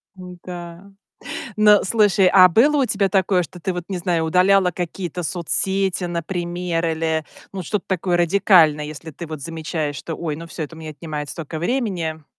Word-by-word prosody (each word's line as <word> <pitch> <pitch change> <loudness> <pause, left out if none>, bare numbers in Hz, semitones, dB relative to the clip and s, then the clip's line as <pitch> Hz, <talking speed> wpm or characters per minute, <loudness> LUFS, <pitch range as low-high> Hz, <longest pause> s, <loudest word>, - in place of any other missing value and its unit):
Н-да. 180 0 -10 0.7
Ну, 210 -1 +6
слушай, 205 -2 +3
а 185 -1 +7
было 280 - +4
у - - +1
тебя 200 -3 +1
такое, 190 -1 +2
что 175 +3 -10
ты 190 - -2
вот, 180 -1 -5
не 190 -2 -3
знаю, 170 -2 0
удаляла 185 +2 +4
какие-то 175 0 -4
соцсети, 190 +2 -1
например, 175 0 -3
или, 160 -1 -1 0.3
ну 190 -2 -5
что-то 205 +3 -3
такое 180 -1 0
радикальное, 175 -4 +4
если 155 +1 -8
ты 170 +3 -8
вот 155 -2 -7
замечаешь, 155 -1 -4
что: 165 - -5
"Ой, 155 -3 -4
ну, 165 +2 -8
всё, 165 - -6
это 160 +2 -7
у - - -11
меня 155 -1 -7
отнимает 150 -1 -6
столько 160 -1 -6
времени". 175 - -2
175 Hz, 175 wpm, -21 LUFS, 160-190 Hz, 0.7 s, а